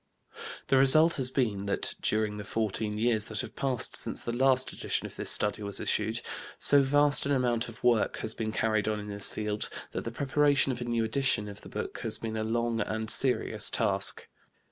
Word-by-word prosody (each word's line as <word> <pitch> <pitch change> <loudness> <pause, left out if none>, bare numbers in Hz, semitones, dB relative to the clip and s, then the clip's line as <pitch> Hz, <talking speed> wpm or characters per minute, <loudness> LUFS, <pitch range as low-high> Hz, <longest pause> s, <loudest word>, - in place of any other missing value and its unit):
The 135 - +4
result 155 +5 +6
has 130 -2 +1
been 105 -7 -2
that, 100 - 0
during 105 -1 -1
the 105 - -6
fourteen 105 0 -3
years 110 -1 +1
that 110 -2 -2
have - - -9
passed 130 -4 -1
since - - -2
the 120 - -5
last 130 +1 +2
edition - - -2
of - - -9
this - - -4
Study 105 +1 +2
was 100 -1 -3
issued, 110 +2 -1 0.4
so 145 -1 +4
vast 145 +1 +3
an - - -1
amount 125 -3 0
of 115 - -14
work 120 -3 +2
has 110 - -3
been 110 -1 -4
carried 110 -1 -1
on 105 -1 -1
in 105 0 -8
this 100 -1 +1
field 105 0 -4 0.2
that - - -5
the 115 - -5
preparation 140 +1 +1
of 120 -1 -6
a - - -4
new 120 -1 -1
edition 110 -2 0
of 100 0 -9
the - - -12
book - - -6
has - - -2
been 110 -1 -6
a 110 - -2
long 115 +1 -1
and 110 +1 -2
serious 130 -2 +3
task. - - +1
115 Hz, 210 wpm, -28 LUFS, 105-130 Hz, 0.4 s, result